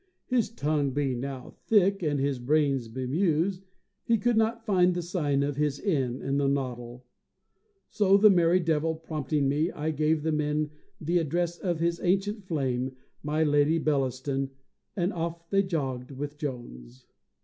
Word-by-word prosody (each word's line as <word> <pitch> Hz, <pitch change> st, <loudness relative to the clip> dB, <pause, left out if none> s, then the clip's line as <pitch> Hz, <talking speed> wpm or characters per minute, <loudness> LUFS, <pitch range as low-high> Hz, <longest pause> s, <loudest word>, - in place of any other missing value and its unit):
His 245 Hz, -5 st, +1 dB
tongue 150 Hz, -, -1 dB
being 135 Hz, -3 st, -1 dB
now 135 Hz, -1 st, -6 dB, 0.2 s
thick, 200 Hz, -2 st, +3 dB
and 150 Hz, -4 st, 0 dB
his 135 Hz, -1 st, 0 dB
brains 135 Hz, -1 st, +1 dB
bemused, 165 Hz, -, -1 dB, 0.4 s
he 230 Hz, -, +2 dB
could 240 Hz, +2 st, +1 dB
not 225 Hz, +1 st, +1 dB
find 180 Hz, -4 st, +3 dB
the 175 Hz, -, -1 dB
sign 150 Hz, -6 st, 0 dB
of 140 Hz, -1 st, -2 dB
his 150 Hz, -1 st, 0 dB
inn 135 Hz, -, -1 dB
in 140 Hz, +1 st, 0 dB
his 140 Hz, -1 st, +2 dB
noddle. 125 Hz, -3 st, -4 dB, 0.9 s
So, 200 Hz, -2 st, +4 dB
the 210 Hz, +1 st, +7 dB
merry 175 Hz, -1 st, +4 dB
devil 160 Hz, -1 st, 0 dB
prompting 155 Hz, -3 st, -2 dB
me, 150 Hz, +5 st, +1 dB
I 155 Hz, +2 st, -2 dB
gave 155 Hz, 0 st, +1 dB
the 160 Hz, -, 0 dB
men 150 Hz, 0 st, 0 dB, 0.3 s
the 170 Hz, +3 st, +1 dB
address 170 Hz, +2 st, -1 dB
of 175 Hz, -4 st, -1 dB
his 170 Hz, 0 st, 0 dB
ancient 195 Hz, +3 st, 0 dB
flame, 130 Hz, -6 st, -2 dB, 0.3 s
my 150 Hz, +2 st, 0 dB
Lady 145 Hz, +1 st, +3 dB
Bellaston, 135 Hz, -2 st, -1 dB, 0.5 s
and 180 Hz, -1 st, 0 dB
off 170 Hz, 0 st, -4 dB
they 195 Hz, 0 st, +4 dB
jogged 135 Hz, -9 st, -3 dB
with 145 Hz, +2 st, -6 dB
Jones. 65 Hz, -, -7 dB
150 Hz, 160 wpm, -28 LUFS, 135-175 Hz, 0.9 s, the